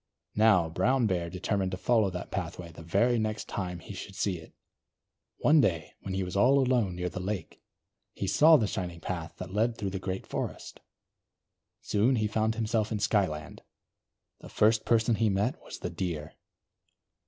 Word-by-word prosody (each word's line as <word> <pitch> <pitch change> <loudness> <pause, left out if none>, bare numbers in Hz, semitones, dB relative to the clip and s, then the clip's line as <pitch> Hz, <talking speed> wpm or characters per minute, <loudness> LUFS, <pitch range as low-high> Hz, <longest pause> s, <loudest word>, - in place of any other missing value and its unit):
Now, 105 -6 +4
Brown 125 +10 +1
Bear 90 -4 0
determined 95 +2 -1
to - - -2
follow 110 -1 +2
that 90 -1 -6
pathway 90 -2 -5
the 80 - -12
very 115 +9 +2
next 110 0 -2
time 90 -3 -4
he 85 - -9
should 95 0 -8
see 95 -3 -1
it. 80 - -14 0.9
One 150 0 +5
day 85 - 0
when 95 -1 -5
he 95 - 0
was 90 +1 -5
all 125 +7 +5
alone, 125 -8 +2
near 90 0 -2
the 90 - -5
lake, 95 -1 -5 0.5
he - - -3
saw 150 - +6
the 115 - +1
shining 90 -4 -4
path 85 -2 -5
that 90 0 -7
led 115 +3 +1
through 100 -2 -3
the 95 - -3
great 95 0 -4
forest. - - -5 1.0
Soon 115 +6 +2
he 110 -2 +1
found 110 +1 0
himself 110 -1 0
in 110 - 0
Skyland. 95 -7 -1 0.8
The - - -12
first 110 +1 +3
person 115 0 +3
he 110 0 +2
met 100 +6 0
was - - -9
the - - -5
Deer. 85 -5 -4
100 Hz, 175 wpm, -29 LUFS, 90-110 Hz, 1.0 s, saw